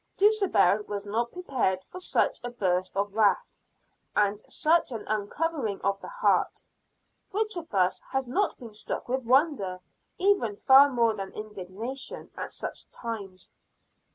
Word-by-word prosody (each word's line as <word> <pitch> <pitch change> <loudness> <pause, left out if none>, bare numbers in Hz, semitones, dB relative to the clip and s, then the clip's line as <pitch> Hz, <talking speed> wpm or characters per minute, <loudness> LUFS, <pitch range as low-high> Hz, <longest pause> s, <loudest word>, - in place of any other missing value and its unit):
Dulcibel 380 - +4
was 205 -1 -4
not 230 +3 -1
prepared 250 - -1
for 365 - -10
such - - +1
a 245 - -3
burst 185 -5 -1
of 200 0 0
wrath, 220 - +2 0.6
and 205 0 +2
such 320 -2 +2
an 225 -3 -5
uncovering 215 +2 -1
of 200 0 0
the - - -8
heart. - - +1 0.7
Which 430 +1 -1
of 335 -2 -7
us 185 -1 +2
has 265 -1 -1
not 380 +10 0
been 230 -3 -10
struck 210 - -4
with 260 0 -1
wonder, 255 - +2 0.4
even 370 - +2
far 270 +6 +7
more 235 -4 +2
than 195 -2 -6
indignation, 215 - -6
at - - -5
such - - -6
times? 200 -6 -6
230 Hz, 145 wpm, -28 LUFS, 200-305 Hz, 0.7 s, far